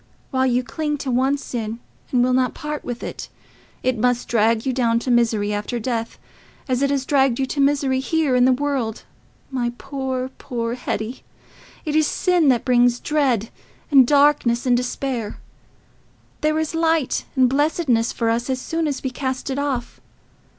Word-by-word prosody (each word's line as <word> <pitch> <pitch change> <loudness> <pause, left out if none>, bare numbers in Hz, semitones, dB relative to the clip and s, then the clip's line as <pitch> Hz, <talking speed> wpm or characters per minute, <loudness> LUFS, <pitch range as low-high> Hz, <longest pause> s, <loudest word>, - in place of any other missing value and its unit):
While 260 -1 +2
you 250 0 +1
cling 295 +5 -2
to 275 -2 -3
one 265 +3 +2
sin 230 -5 -5 0.3
and 245 -2 +3
will 255 0 +2
not 255 0 +1
part 300 0 -5
with 245 -1 -5
it, - - -6 0.5
it 255 -3 0
must 245 +1 +1
drag 225 0 +2
you 260 - 0
down 235 -2 +2
to 245 +2 -1
misery 225 -3 +2
after 210 +4 -3
death, 230 -1 -3 0.5
as 255 -1 0
it 280 - +2
has 275 -2 0
dragged 270 -4 +3
you 270 - +2
to 280 - -4
misery 275 -2 +2
here 300 -1 +1
in 250 0 +5
this 255 0 +4
world, 270 -6 -2 0.5
my 240 -2 -1
poor, 260 -2 -3
poor 235 -1 -3
Hetty. 240 -1 -4 0.6
It 300 -1 -2
is 310 -1 +4
sin 355 -4 +2
that 245 -3 +2
brings 245 -1 +3
dread, 260 -8 0 0.4
and 265 -4 +7
darkness, 280 -4 +3
and 250 -1 +4
despair: 245 -2 -3 1.0
there 310 0 +1
is 315 0 -1
light 325 -4 +1
and 260 -1 +5
blessedness 270 -4 +1
for 230 -1 0
us 235 +3 -1
as 260 -1 0
soon 325 +4 -2
as 285 -2 -3
we 265 - -2
cast 260 +1 -3
it 270 - -2
off. 270 -4 -3
255 Hz, 175 wpm, -21 LUFS, 240-280 Hz, 1.0 s, and